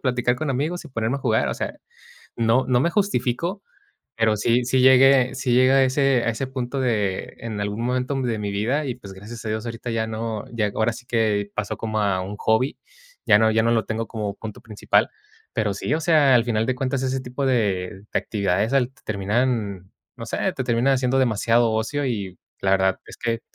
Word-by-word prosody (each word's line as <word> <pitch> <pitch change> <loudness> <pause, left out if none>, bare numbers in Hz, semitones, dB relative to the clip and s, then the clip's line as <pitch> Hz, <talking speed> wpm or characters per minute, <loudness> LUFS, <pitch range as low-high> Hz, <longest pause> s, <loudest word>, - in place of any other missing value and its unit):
platicar 125 -1 +1
con 155 0 -2
amigos 155 +7 -2
y - - -10
ponerme 115 0 -1
a - - -5
jugar. 110 -4 +1
O - - -2
sea, - - -3 0.6
no 115 +3 +2
no 125 -1 +3
me 170 - +2
justifico, 175 - -1 0.6
pero 110 -1 +3
sí, 120 +4 +2
sí 130 +1 +1
llegué 130 0 +6
sí 130 -1 -1
llegué 130 +2 +5
a 135 0 +5
ese 135 -1 +2
a 115 - +2
ese 115 +4 -3
punto 130 0 -4
de 105 -7 -1
en 110 -3 -5
algún 105 +3 -3
momento 125 +2 -1
de 120 -3 -1
mi 105 -1 -3
vida 120 +9 -1
y 125 - -2
pues, 100 -6 -11
gracias 110 +5 -10
a - - -3
Dios 110 +2 -3
ahorita 115 +1 -5
ya 110 -1 -1
no, 110 -1 -4
ya 105 -3 0
ahora 110 +1 +1
sí 125 +2 -11
que 110 -4 0
pasó 105 -1 -3
como 110 -1 -2
a 100 -3 +1
un 100 +2 -6
hobby. 110 +5 +1 0.5
Ya 105 - +6
no 110 0 +4
ya 110 0 +2
no 115 - +2
lo 115 -1 +1
tengo 115 0 -3
como 105 -3 -4
punto 110 -2 -8
principal. 110 -3 +1 0.4
Pero 105 -3 0
sí, 100 - -3
o 160 - +1
sea, 155 -5 +4
al 120 -2 +4
final 110 -2 0
de 130 +2 0
cuentas 130 +1 -2
ese 130 0 -1
tipo 125 +2 -4
de 100 -6 0
de - - +1
actividades 100 +1 -1
al 130 -2 +2
terminan, 105 -2 -1 0.2
no - - -7
sé, - - -4 0.2
te 130 - -3
terminan 120 +3 +2
haciendo 130 0 +1
demasiado 115 -1 +2
ocio 125 +6 -1
y 100 -7 -4 0.2
la 95 - +2
verdad 95 -1 +2
es - - -13
que 115 -1 -2
115 Hz, 215 wpm, -23 LUFS, 110-130 Hz, 0.6 s, llegué